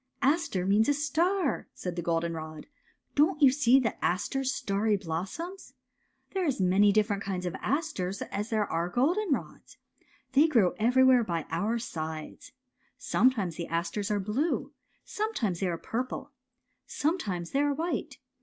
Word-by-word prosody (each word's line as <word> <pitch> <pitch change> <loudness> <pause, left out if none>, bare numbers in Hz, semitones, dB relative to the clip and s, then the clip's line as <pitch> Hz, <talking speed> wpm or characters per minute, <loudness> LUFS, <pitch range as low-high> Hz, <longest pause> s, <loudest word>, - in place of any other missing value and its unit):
" - - -55
" - - -46
Aster 325 - -3
means 210 +6 +3
a 290 - +3
star," 325 +3 0
said 180 -2 -5
the 175 - -2
goldenrod. 165 -2 -3 0.3
'' - - -45
Don't 305 +3 +3
you 275 -4 +7
see 265 -2 +4 0.2
aster's 265 +9 0
starry 205 -2 0
blossoms? 195 - -5 0.6
a - - -27
There 380 -1 0
are - - 0
as 275 - 0
many 190 +2 +4
different 205 -1 +1
kind 185 -2 -3
of 175 - -2
asters 265 - -2
as 210 +2 -4
there 215 -2 +1
are 170 0 -2
goldenrods. 320 - -1 0.5
They 285 +4 +5
grow 230 - +3
every 250 +4 +4
where 255 -2 +6
by 170 -6 -2
our 205 +8 0
sides. 160 - -6 0.5
Sometimes 215 -10 +1
the 170 - -4
asters 170 +5 -2
are 210 -1 +1
blue. 220 - -1 0.3
Sometimes 260 - -2
they 190 - 0
are 170 -2 -1
purple. 255 - -4 0.6
Sometimes 210 - -2
they 275 - +1
are 290 -1 +1
white. 335 +4 -3
220 Hz, 160 wpm, -29 LUFS, 180-285 Hz, 0.6 s, you